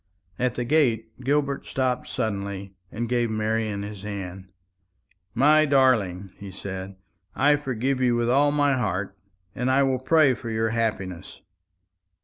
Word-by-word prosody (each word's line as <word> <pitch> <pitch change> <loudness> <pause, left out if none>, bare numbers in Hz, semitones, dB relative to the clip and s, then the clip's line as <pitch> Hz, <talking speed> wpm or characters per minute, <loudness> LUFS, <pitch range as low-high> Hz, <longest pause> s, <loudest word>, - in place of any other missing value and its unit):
At 125 -1 0
the 120 - -2
gate 120 -6 +2
Gilbert 140 +1 0
stopped 130 -1 -1
suddenly, 100 -2 -4 0.2
and 120 +2 -3
gave 120 -1 0
Marian 110 -1 -1
his 100 -1 -7
hand. 95 -2 -7 0.8
"My 150 +5 +5
darling," 110 -10 +2
he 100 - -9
said, 95 0 -7 0.4
"I 145 +2 +4
forgive 135 -2 -2
you 125 -2 +3
with 120 0 0
all 140 +4 +4
my 145 -1 +3
heart; 100 -6 -2 0.4
and 125 +1 -1
I 135 +1 +4
will 130 -1 +1
pray 140 0 +4
for 115 - -7
your 110 0 0
happiness." 105 -6 -3
115 Hz, 140 wpm, -25 LUFS, 100-135 Hz, 0.8 s, My